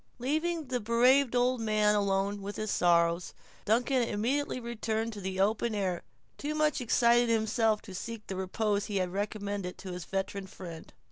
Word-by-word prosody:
Leaving 315 +6 -1
the 250 -1 -2
bereaved 245 +4 +4
old 245 0 +2
man 215 -1 +3
alone 200 0 0
with 200 +1 -5
his 215 -1 -3
sorrows, 170 0 +2 0.3
Duncan 245 +4 +2
immediately 245 +5 -1
returned 225 -1 -2
into 205 - -7
the 190 0 -4
open 215 +3 +1
air, 185 -4 -1 0.4
too 300 +1 -3
much 305 -2 +1
excited 240 0 +4
himself 220 -1 +2
to 195 - -10
seek 220 +3 -6
the 190 - -5
repose 205 +2 -1
he 205 - -2
had 185 -1 -1
recommended 200 -2 -3
to 190 - -7
his 180 -2 -6
veteran 195 0 -3
friend. 170 -4 -9
215 Hz, 165 wpm, -30 LUFS, 195-240 Hz, 0.4 s, bereaved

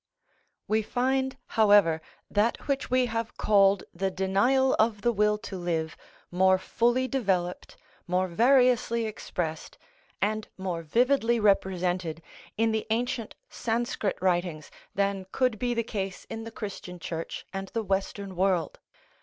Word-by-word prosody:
We 215 +1 +2
find, 260 +4 0
however, 205 -7 +4 0.3
that 210 +3 0
which 275 0 -1
we 255 0 +3
have 230 -1 -3
called 200 -2 +4
the 195 0 -1
denial 200 +9 +2
of 215 -1 +2
the 240 - +2
will 210 -1 +2
to 210 - -8
live 165 -3 -2 0.4
more 190 +1 +4
fully 240 +6 +1
developed, 190 -10 -1 0.3
more 180 +1 +1
variously 240 +2 +3
expressed, 175 -6 -4 0.4
and 215 +1 -1
more 185 -3 -3
vividly 235 - +2
represented 180 -5 +1 0.3
in 225 +1 +2
the 220 0 -2
ancient 230 0 -1
Sanscrit 230 - -2
writings 175 -4 -1 0.2
than 195 -1 0
could 250 -5 +1
be 245 0 0
the 230 - +1
case 195 -4 -4
in 225 0 -5
the 225 - -7
Christian 195 -4 -7
Church 165 -1 -5
and 195 0 -4
the 225 +3 -3
Western 195 0 -2
world. 185 -2 0
205 Hz, 135 wpm, -27 LUFS, 185-235 Hz, 0.4 s, however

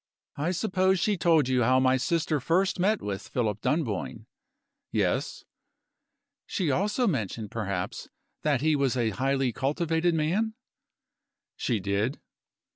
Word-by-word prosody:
I 150 +4 0
suppose 185 0 +1
she 205 +4 +2
told 165 -6 +3
you 130 -1 +2
how 130 +2 +4
my 130 0 +4
sister 155 +3 0
first 180 +8 +1
met 205 +4 +2
with 100 -2 -4
Philip 105 -4 -1
Dunboyne?" 115 - -2 0.7
"Yes." - - -1 1.0
"She 175 -7 0
also 210 - +1
mentioned, 110 - -2
perhaps, 95 -5 -4 0.3
that 145 -4 +1
he 155 0 +3
was 135 -3 +1
a 115 -2 +1
highly 135 +2 0
cultivated 165 +5 0
man?" 195 +9 0 1.0
"She 115 -4 -1
did." 100 +7 -1
140 Hz, 125 wpm, -27 LUFS, 120-175 Hz, 1.0 s, how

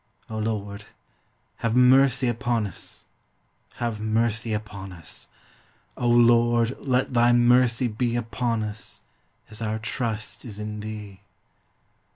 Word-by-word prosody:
O 110 - -3
Lord, 105 -1 -3 0.7
have 115 0 -1
mercy 130 0 +5
upon 120 -1 0
us, 95 - -9 0.7
have 115 -3 -3
mercy 110 +1 0
upon 105 -3 -5
us. 85 -4 -6 0.7
O 120 - -1
Lord, 120 0 +4
let 130 -1 0
thy 120 0 +4
mercy 120 0 +4
be 120 +2 -1
upon 115 -1 -1
us, 105 0 -4 0.5
as 110 - -10
our 110 0 -1
trust 110 -2 -3
is 110 -5 -7
in 105 0 -5
thee. 105 -2 -8
115 Hz, 120 wpm, -25 LUFS, 105-120 Hz, 0.7 s, mercy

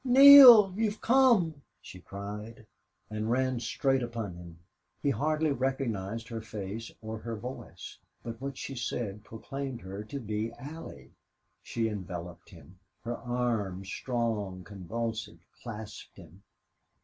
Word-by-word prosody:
"Neale! 255 -6 +10
You've 215 0 -1
come!" 225 - +3 0.2
she 90 - -12
cried, 105 +4 -8 0.5
and 110 +1 -3
ran 130 0 +1
straight 135 +3 0
upon 115 -5 -4
him. 85 -1 -11 0.5
He 140 - +3
hardly 155 +5 0
recognized 115 -5 -2
her 115 -1 -5
face 110 +1 -6
or 110 0 -5
her 115 0 -5
voice, 125 +5 -9 0.2
but 115 0 -7
what 140 -1 -5
she 135 - -6
said 110 -5 -4
proclaimed 135 +3 -6
her 95 +2 -7
to 140 +5 -6
be 110 0 -3
Allie. 120 - -10 0.5
She 115 -1 -2
enveloped 90 -5 -7
him. 90 +6 -16 0.2
Her 120 +1 -3
arms, 115 -6 -2
strong, 110 -8 -2
convulsive, 110 +4 -5 0.2
clasped 110 -3 -9
him. 95 +4 -15
115 Hz, 125 wpm, -29 LUFS, 105-135 Hz, 0.5 s, Neale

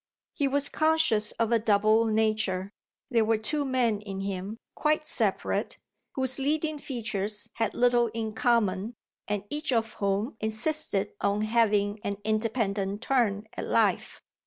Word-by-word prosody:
He 285 - 0
was 285 +1 +1
conscious 310 -11 +2
of 230 0 -1
a 230 - +4
double 215 +1 +3
nature; 215 -3 0 0.4
there 230 -2 +4
were 220 0 +2
two 285 +8 -1
men 250 -6 +1
in 195 -2 -6
him, 195 +2 -4 0.2
quite 305 0 +1
separate, - - -1 0.4
whose 260 -1 +2
leading 300 +2 0
features 215 -5 -3
had 225 -3 -1
little 240 -1 +3
in 220 -1 -4
common 220 -2 +1 0.3
and 205 -1 -2
each 300 0 -1
of 225 -2 0
whom 200 +4 -1
insisted 220 0 -1
on 200 +1 +1
having 215 -2 +2
an 200 0 -2
independent 215 -2 -1
turn 225 -6 +1
at - - -4
life. - - +1
220 Hz, 140 wpm, -28 LUFS, 205-250 Hz, 0.4 s, a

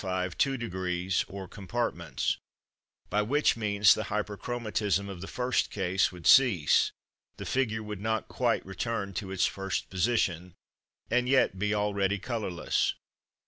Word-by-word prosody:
5 95 -1 -2
two 135 -1 +1
degrees 90 -5 -1
or 95 0 -7
compartments; 95 -4 -2 0.7
by 105 - +2
which 140 +8 +2
means 105 -3 +4
the 110 - -3
Hyperchromatism 105 -1 -2
of 95 -3 -7
the 95 - -6
first 125 0 0
case 95 -1 +1
would 90 -2 -12
cease, 120 - +5 0.5
the - - -6
figure 110 -4 0
would 105 -2 -6
not 110 0 -1
quite - - 0
return 100 -4 -3
to 95 +1 -4
its 95 -1 +1
first 95 -1 -3
position, 90 -3 0 0.6
and 125 +1 +2
yet 130 -8 +3
be 105 +1 +1
already 100 -1 +1
colourless. 105 -6 -1
100 Hz, 140 wpm, -29 LUFS, 95-115 Hz, 0.7 s, cease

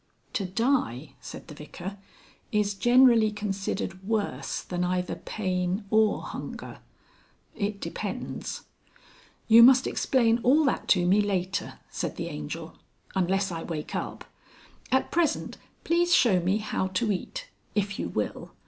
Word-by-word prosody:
"To 195 - -1
Die," 185 - 0
said - - -9
the - - -9
Vicar, 175 +7 -8 0.5
"is 210 -1 +1
generally 240 0 +5
considered 195 -2 -3
worse 200 - -2
than 180 0 -2
either 180 0 -1
pain 185 0 -2
or 220 -1 +3
hunger.... - - -7 0.8
It 200 -1 -2
depends." - - -5 0.8
"You 230 +1 +9
must 255 +2 +8
explain 235 -3 +2
all 280 +7 +5
that 275 - 0
to 180 -3 +4
me 195 +4 +4
later," 190 -2 -2
said - - -3
the - - -4
Angel. 75 0 -7 0.3
"Unless 190 +1 +1
I 165 -1 -4
wake 155 -3 -5
up. - - -4 0.7
At 265 - +2
present, 340 -2 0 0.3
please 345 +1 +2
show 205 -7 +4
me 185 +4 +1
how 210 -3 -2
to 210 +4 0
eat. - - -4 0.3
If 200 -1 -1
you - - -2
will. - - -3
200 Hz, 135 wpm, -27 LUFS, 180-230 Hz, 0.8 s, You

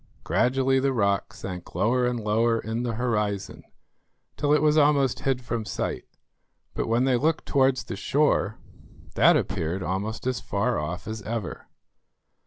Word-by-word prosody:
Gradually 135 +1 +2
the 135 0 +1
rock 100 -2 +1
sank 95 -7 -8
lower 120 +7 +2
and 125 -1 -1
lower 115 +2 +1
in 110 +2 -3
the 120 -1 -2
horizon, 105 -4 -2 0.7
till 145 - 0
it 150 0 +4
was 150 0 +4
almost 145 -4 +3
hid 130 -2 -1
from 115 -1 -3
sight; 105 - -3 0.7
but - - -2
when 115 +2 +2
they 130 -2 +3
looked 160 +5 0
towards 130 -2 +2
the - - -6
shore, 140 -7 +1 0.6
that - - +5
appeared 90 0 -2
almost 100 +7 -3
as 130 -1 0
far 110 +5 -1
off 80 +4 -5
as 110 0 -5
ever. 110 -2 -5
115 Hz, 155 wpm, -26 LUFS, 105-130 Hz, 0.7 s, that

